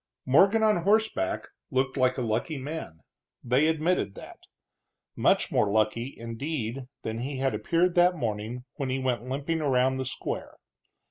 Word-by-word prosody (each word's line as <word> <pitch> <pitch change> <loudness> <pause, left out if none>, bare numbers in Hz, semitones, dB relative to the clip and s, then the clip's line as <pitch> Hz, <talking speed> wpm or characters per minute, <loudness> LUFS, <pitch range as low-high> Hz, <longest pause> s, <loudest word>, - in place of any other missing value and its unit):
Morgan, 195 - +5
on 215 -2 +4
horseback, 200 - +1 0.2
looked 130 +1 0
like 130 -1 +2
a 125 - -1
lucky 120 +7 -1
man; 135 - -6 0.4
they 125 +5 +3
admitted 160 - +1
that. - - -11 0.8
Much - - +2
more 105 - +2
lucky, 110 +5 0
indeed, 120 +1 -4 0.2
than 110 +1 -3
he 135 +3 -4
had 135 0 0
appeared 175 +1 +1
that 180 +1 +4
morning 115 -2 -3
when 140 -4 -2
he 130 - 0
went 130 -1 -2
limping 145 +5 -1
around 130 -2 +2
the 130 - -2
square. 125 - -5
130 Hz, 150 wpm, -27 LUFS, 120-160 Hz, 0.8 s, Morgan